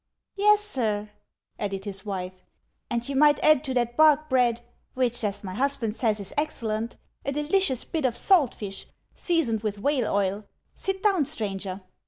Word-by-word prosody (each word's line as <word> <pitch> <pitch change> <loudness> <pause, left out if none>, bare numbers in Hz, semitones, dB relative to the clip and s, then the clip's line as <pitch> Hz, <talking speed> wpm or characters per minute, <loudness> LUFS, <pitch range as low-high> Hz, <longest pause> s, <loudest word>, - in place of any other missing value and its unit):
" - - -61
Yes, 415 +1 +5
sir," 215 - -2 0.5
added 195 -1 -3
his 195 -2 -5
wife; 185 -2 -3 0.3
" - - -48
and 240 -1 -2
you 280 - -3
might 295 +1 +5
add 305 -2 +5
to 265 - -2
that 240 -1 0
bark 310 0 +5
bread 240 -2 +3 0.2
— - - -43
which, 245 -2 0
as 205 -1 -2
my 185 -2 -5
husband 250 -2 -1
says, 220 -4 0
is 200 -1 -7
excellent 230 -7 -2
— - - -43
a 280 - -2
delicious 295 -1 +1
bit 320 -3 -3
of 240 -2 +1
salt 340 - +4
tish, 195 -2 -6 0.3
seasoned 290 - 0
with 210 -2 -2
whale 260 +2 0
oil. 200 +1 0 0.3
Sit 385 0 -3
down, 385 -8 +3
stranger." 195 -4 -4
240 Hz, 185 wpm, -26 LUFS, 210-295 Hz, 0.5 s, Yes